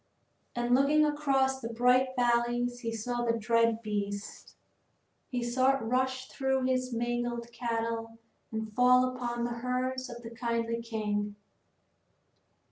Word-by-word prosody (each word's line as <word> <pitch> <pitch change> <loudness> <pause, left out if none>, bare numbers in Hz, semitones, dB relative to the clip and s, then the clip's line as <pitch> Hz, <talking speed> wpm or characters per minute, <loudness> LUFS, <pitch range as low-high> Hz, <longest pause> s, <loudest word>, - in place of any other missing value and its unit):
And 240 0 +1
looking 290 +4 +5
across 270 -3 +1
the 230 - -4
bright 250 +3 +4
valleys 240 0 +1
he 230 -2 -3
saw 240 +2 -2
the 230 -1 +1
dread 230 0 +2
beast. 205 -1 -4 0.7
He 245 -2 -2
saw 260 +3 +3
it 270 - -7
rush 260 +2 0
through 265 -1 0
his 255 0 0
own 235 - -2
mangled 240 0 -2
cattle 230 -1 -3 0.3
and 220 -1 -4
fall 250 +2 +4
upon 240 -1 -3
the 235 0 -3
herds 255 +1 -2
of 240 0 -9
the 230 - -8
kindly 230 0 -2
king. 210 -2 -2
240 Hz, 135 wpm, -30 LUFS, 230-255 Hz, 0.7 s, looking